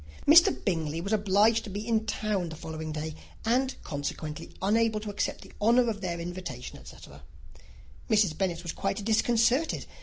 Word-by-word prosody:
Mr. 335 +3 +8
Bingley 165 -4 -1
was 200 +5 -2
obliged 215 +2 +3
to 215 - -7
be 205 +3 -5
in 220 -1 +1
town 210 -5 -1
the 160 - -7
following 160 -1 -6
day, 155 +1 -4 0.3
and 260 +3 +1
consequently 150 +1 -5
unable 220 +2 +2
to 210 -1 -5
accept 205 - -2
the - - -14
honour 235 +3 +4
of 205 -2 -7
their 170 -2 -3
invitation, 170 -8 -6
etc. 70 +1 -13 0.9
Mrs. 210 -7 +3
Bennet 175 -1 -2
was 170 - -3
quite 205 - -3
disconcerted. 235 +6 +2
200 Hz, 160 wpm, -28 LUFS, 165-225 Hz, 0.9 s, Mr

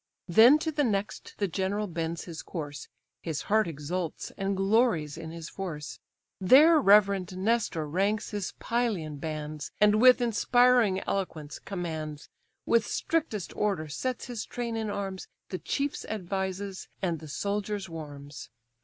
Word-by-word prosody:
Then 225 - +7
to 320 +1 -2
the 295 -1 +1
next 205 -4 -2
the 200 - 0
general 195 +3 -1
bends 165 -2 -3
his 165 -3 -7
course; 145 -5 -6 0.3
(His 160 -3 -3
heart 215 -1 +2
exults, 165 +2 -4
and 195 0 -1
glories 195 - +2
in 165 -1 -7
his 165 0 -7
force); 165 -7 -6 0.4
There 295 - +7
reverend 195 -4 +4
Nestor 195 -6 0
ranks 200 +7 0
his 205 -3 -3
Pylian 210 -11 -1
bands, 155 -1 -5
And 210 +1 +5
with 255 0 +8
inspiring 240 -3 +3
eloquence 155 -7 -3
commands; 160 -5 -5 0.4
With 230 -2 +3
strictest 300 - -2
order 195 -7 0
sets 250 - -3
his 240 -4 -4
train 235 -2 -4
in 220 -1 -2
arms, 195 -2 -4 0.2
The 185 - -4
chiefs 285 0 -2
advises, 190 -1 -4 0.2
and 170 -4 0
the 155 - -10
soldiers 200 +4 -2
warms. 145 -3 -9
195 Hz, 140 wpm, -28 LUFS, 165-220 Hz, 0.4 s, with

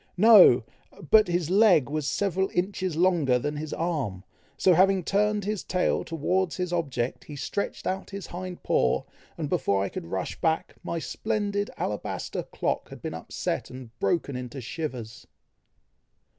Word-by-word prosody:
"No! 190 - +8 0.5
but 215 -2 +7
his 175 -1 -1
leg 195 - +5
was 150 0 -2
several 190 +4 0
inches 185 -1 -1
longer 165 -8 +3
than 145 +4 -3
his 155 0 -5
arm, 140 - -2 0.3
so 185 +5 +5
having 190 +1 +4
turned 210 +2 +1
his 210 -1 -2
tail 180 0 0
towards 175 +3 -1
his 180 -1 -2
object, 135 -8 -2
he 150 - -8
stretched 170 +8 -3
out 190 +1 -2
his 200 -2 -6
hind 180 0 -7
paw, - - +2 0.3
and 160 -3 -2
before 130 - +1
I 100 - -2
could - - -7
rush 95 +2 -4
back, 160 -1 0
my 170 - -3
splendid 205 +3 -2
alabaster 105 - -3
clock - - -3
had - - -11
been - - -4
upset - - -4
and 125 -3 -10
broken 125 - -1
to 135 - -8
shivers." 120 -5 -6
170 Hz, 155 wpm, -27 LUFS, 135-190 Hz, 0.5 s, No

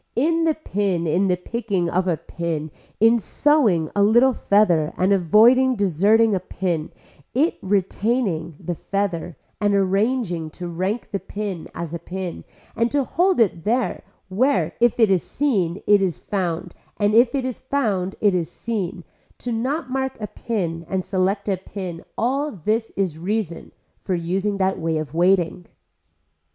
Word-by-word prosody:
In 330 +6 +2
the 320 -2 +2
pin 195 - -1
in 175 +5 +2
the 180 -1 +2
picking 200 -2 -2
of 185 +2 0
a 170 -3 +1
pin, 160 -3 -4 0.3
in 225 +2 +5
sewing 220 - +2
a 205 - +3
little 240 +6 +5
feather 175 -9 +2
and 190 +2 +3
avoiding 230 +8 +5
deserting 205 +3 +3
a 190 - +1
pin, 175 -3 -3 0.5
in 305 +7 +3
retaining 195 - 0
the 175 - -3
feather 180 -3 -3 0.2
and 205 -1 +2
arranging 195 -3 0
to 180 - -5
rank 185 +7 -3
the 200 - -1
pin 200 -5 -5
as 170 -1 -5
a 170 - -3
pin 180 +1 -6 0.3
and 230 +1 +1
to 285 +1 +1
hold 360 +5 +1
it 180 -7 +2
there 240 +5 0 0.3
where 190 - +1
if 240 0 +3
it 220 -4 +5
is 185 -3 +3
seen 195 - -1
it 205 -1 +5
is 180 -8 0
found 175 +3 -3 0.2
and 205 0 +2
if 235 +3 +5
it 265 -2 -1
is 255 -2 -4
found 210 -9 -1
it 205 -2 +4
is 170 -4 -1
seen, 195 -6 -4 0.3
to 245 - -5
not 260 +5 -2
mark 265 -1 -2
a 210 - -3
pin 180 -7 -3
and 190 -1 -1
select 195 +2 -1
a 195 -2 +1
pin 185 -2 -7
all 275 +5 0
this 220 - -1
is 185 -6 -1
a - - -12
reason 190 -1 -3 0.3
for 185 - -2
using 190 +4 -1
that 190 0 0
way 165 -1 -1
of 155 -1 -5
waiting. 175 0 +2
195 Hz, 165 wpm, -22 LUFS, 175-230 Hz, 0.5 s, in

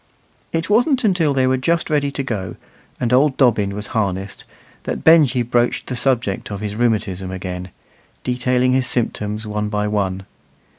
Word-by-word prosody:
It 165 0 -1
wasn't 235 - +3
till 160 -5 +2
they 130 -2 +2
were 130 0 +2
just 165 +6 0
ready 145 -2 +2
to 140 0 -3
go, 95 -8 -4 0.4
and 125 -1 0
old 135 +2 +3
Dobbin 105 -7 +2
was 105 0 -4
harnessed, 100 -3 -2 0.4
that - - -3
Benjy 150 -6 +5
broached 120 0 0
the 125 - -4
subject 120 -6 -1
of 100 -1 -5
his 105 0 -4
rheumatism 105 -5 0
again, 90 0 -5 0.5
detailing 125 0 +1
his 130 -1 +2
symptoms 105 -3 -2
one 105 0 -2
by 105 0 -1
one. 95 -2 -1
120 Hz, 160 wpm, -20 LUFS, 105-135 Hz, 0.5 s, Benjy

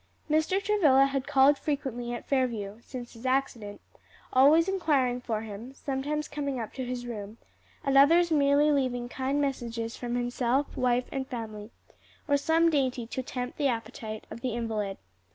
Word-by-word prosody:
Mr. 315 +5 +2
Travilla 330 -10 +4
had 275 -1 -2
called 280 0 +5
frequently 260 -5 -3
at 240 - -6
Fairview, 230 -6 -1
since 245 -1 -8
his 230 0 -13
accident, 255 -6 -1 0.5
always 295 +6 +6
inquiring 280 -10 +1
for 220 -3 -2
him, 220 +5 -8
sometimes 290 +3 -3
coming 280 -3 -3
up 225 - -5
to 260 - -4
his 245 -1 -4
room, 215 -2 -7 0.5
at 275 0 +1
others 335 +5 +6
merely 290 0 +4
leaving 255 -4 0
kind 265 +3 -2
messages 235 -5 -2
from 240 -1 -4
himself, 245 +3 0
wife 250 0 +1
and 265 -1 -3
family, 220 -4 -6 0.6
or 285 - +3
some 325 +3 +3
dainty 260 -5 0
to 255 +3 -4
tempt 250 +1 -5
the 285 - +3
appetite 225 -3 -4
of 230 - -8
the 245 -2 -2
invalid. 215 -4 -2
260 Hz, 160 wpm, -28 LUFS, 235-285 Hz, 0.6 s, always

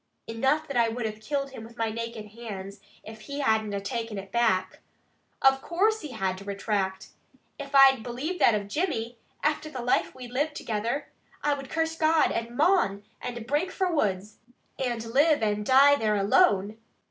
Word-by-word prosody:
"Enough 270 +7 0
that 275 - -3
I 230 -1 +4
would 230 +1 -3
have 215 0 -5
killed 275 +3 -2
him 245 -4 -9
with 230 +1 -13
my 225 -1 -1
naked 230 -1 -6
hands 200 -3 -8 0.2
if 220 0 -11
he 280 +6 -5
had 220 -5 +2
na 200 -1 -3
taken 225 +1 -4
it 195 0 -8
back. 205 -6 +1 0.6
Of 270 0 +5
course 425 +8 +1
he 305 - -7
had 190 -4 -2
to - - -10
retract! 195 -1 -2 0.5
If 280 0 -6
I 270 -1 +8
believed 255 +10 -4
that 230 - +6
of 205 -1 -3
Jimmy, 240 - -2 0.2
after 300 +1 0
the 255 -5 -6
life 245 - +1
we 255 -1 -8
lived 290 +5 -2
together, 230 +5 -3 0.3
I 295 - +2
would 275 -1 -6
curse 325 0 -1
God 315 0 +3
and 230 +1 -4
mon, 300 - +2 0.2
and 240 -2 -5
break 295 +9 0
fra 380 -1 -1
the - - -2
woods, 205 - -1 0.4
and 240 -3 -2
live 285 +3 +3
and 210 -1 0
dee 275 +4 +6
there 215 -1 +1
alone." 205 - +3
235 Hz, 185 wpm, -27 LUFS, 215-285 Hz, 0.6 s, I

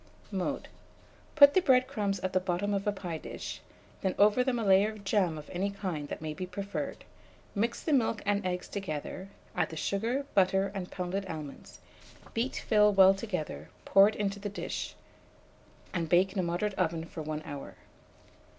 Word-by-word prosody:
Mode. 200 +8 -2 0.7
Put 285 -2 +9
the 375 - +5
bread 255 -6 +5
crumbs 205 -7 -1
at 185 0 -2
the 185 - +4
bottom 185 +2 -1
of 200 +1 -1
a - - +4
pie 175 -5 -5
dish, - - -7 0.4
then 190 -1 0
over 210 +5 +5
them 255 -1 0
a 230 - -1
layer 195 +1 +5
of 210 -2 -12
jam 190 -5 +1
of 150 - -9
any 190 +3 -1
kind 185 -7 -4
that 155 - -6
may 155 -1 -3
be 185 +4 -5
preferred; 200 +2 -4 0.5
mix 230 +3 -1
the 315 - +1
milk 230 -4 +2
and 205 0 +1
eggs 180 -1 -2
together; 185 0 -5 0.3
add - - +1
the 160 - -7
sugar, 230 - -1
butter, 190 0 +3
and 190 -3 -4
pounded 190 +2 -3
almonds; 155 -4 -8 0.5
beat 240 +4 -2
fill 210 -1 +5
well 195 -1 +7
together; 180 - -4 0.2
pour 195 +1 +7
it 215 - -6
into 200 -1 -2
the 205 +1 -4
dish, 200 - -4 1.0
and 170 -3 -1
bake 185 +3 +4
in 200 - -2
a - - +4
moderate 175 +4 -1
oven 165 -2 0
for 165 - -7
1 155 0 -4
hour. 145 -1 -7
195 Hz, 185 wpm, -30 LUFS, 175-210 Hz, 1.0 s, Put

